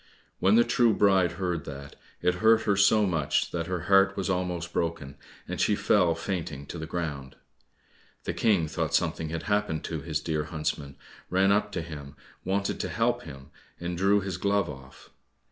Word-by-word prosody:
When 95 +3 +4
the 120 - +6
true 120 -4 +3
bride 95 -4 +3
heard 90 -3 -2
that, 70 0 -8 0.3
it 90 - +3
hurt 110 0 +5
her 100 - +2
so 105 +2 +4
much 75 -5 0
that 85 -1 -3
her 90 -2 -2
heart 100 +3 +4
was 95 -1 -1
almost 90 -2 -2
broken, 80 -5 -2 0.3
and - - -3
she 105 - +3
fell 90 -6 +3
fainting 80 -7 -4
to 85 - -7
the 80 - -5
ground. 75 -6 -4 0.9
The - - -2
King 100 -8 +2
thought 75 - -1
something 80 -1 0
had 80 +1 -4
happened 105 -6 0
to 80 -3 -4
his 75 -1 -2
dear 75 0 -2
huntsman, 75 -3 -4 0.3
ran 95 +2 +3
up 105 +1 +2
to 80 - -2
him, 75 -3 -9 0.3
wanted 100 +2 -1
to - - -2
help - - 0
him, 70 0 -11 0.3
and 85 0 -3
drew 100 +3 +3
his 95 -3 -4
glove 100 -2 +1
off. 65 0 -14
85 Hz, 180 wpm, -27 LUFS, 75-100 Hz, 0.9 s, the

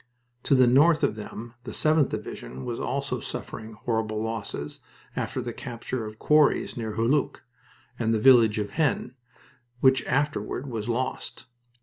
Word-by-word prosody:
To 140 - +4
the 130 -1 +6
north 150 +6 +5
of - - +3
them 110 +2 -8
the - - -8
7th 155 -3 +3
Division 65 +2 -6
was - - -3
also - - -2
suffering 110 0 -6
horrible 110 -1 -2
losses 110 -9 -4 0.4
after - - -2
the - - -4
capture 115 0 -5
of 110 - -7
the - - -24
quarries, 150 +1 +3
near 110 -3 -4
Hulluch, 120 +6 +1 0.6
and 115 -1 +1
the 110 - +2
village 115 -3 +6
of 105 -1 -2
Haisnes, 145 -5 0 0.7
which 130 -2 +4
afterward 140 -3 -1
was 115 -4 -4
lost. 125 +2 -3
115 Hz, 150 wpm, -26 LUFS, 110-135 Hz, 0.7 s, the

